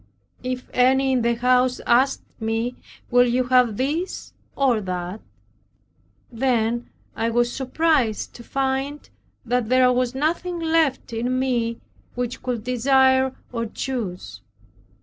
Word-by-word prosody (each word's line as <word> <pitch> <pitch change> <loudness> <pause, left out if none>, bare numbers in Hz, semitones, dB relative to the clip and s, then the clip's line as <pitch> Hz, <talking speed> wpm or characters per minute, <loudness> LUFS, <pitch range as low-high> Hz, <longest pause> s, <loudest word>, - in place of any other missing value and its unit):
If 255 0 -4
any 265 +2 +3
in 255 -2 +2
the 235 0 +1
house 250 +1 +2
asked 260 +3 +3 0.2
me, 225 +2 -2 0.4
"Will 245 0 +5
you 250 +2 +1
have 250 -4 +3
this, 305 +8 -3 0.2
or 255 -6 +2
that?" 180 +1 -4 1.1
then 235 -1 0 0.3
I 230 - 0
was 240 +1 +1
surprised 265 -4 0
to 235 - -11
find 270 +3 -2 0.4
that 245 -1 0
there 255 0 +5
was 250 0 0
nothing 340 +5 -1
left 320 -7 +1
in 245 +3 -1
me 240 -3 -1 0.3
which 245 0 -3
could 240 -4 -3
desire 260 +1 +3 0.2
or 230 -2 -2
choose. 185 - -5
250 Hz, 125 wpm, -23 LUFS, 235-265 Hz, 1.1 s, Will